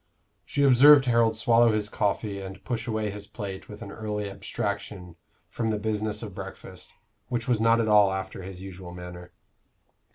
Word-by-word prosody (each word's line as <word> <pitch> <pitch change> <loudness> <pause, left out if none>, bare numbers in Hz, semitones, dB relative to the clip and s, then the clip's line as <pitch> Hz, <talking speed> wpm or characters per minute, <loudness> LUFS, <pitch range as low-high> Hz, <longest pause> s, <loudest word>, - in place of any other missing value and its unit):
She 140 - 0
observed 140 +1 +8
Harold 115 -2 +3
swallow 115 0 +4
his 105 -1 0
coffee 105 -1 -2
and 95 0 -9
push 120 -2 -3
away 110 -2 -1
his 100 0 -8
plate 100 -4 -7
with 105 0 -9
an 100 - -9
early 105 -2 -4
abstraction 100 -3 -5 0.3
from 115 -1 -3
the 110 - 0
business 105 0 -2
of 105 -4 -7
breakfast 95 -1 -10 0.3
which 120 -2 -3
was 120 -3 +1
not 115 +1 +4
at 115 - +1
all 105 -2 +5
after 95 0 -5
his 95 0 -9
usual 90 -2 -9
manner. 90 0 -9
105 Hz, 170 wpm, -26 LUFS, 95-115 Hz, 0.3 s, observed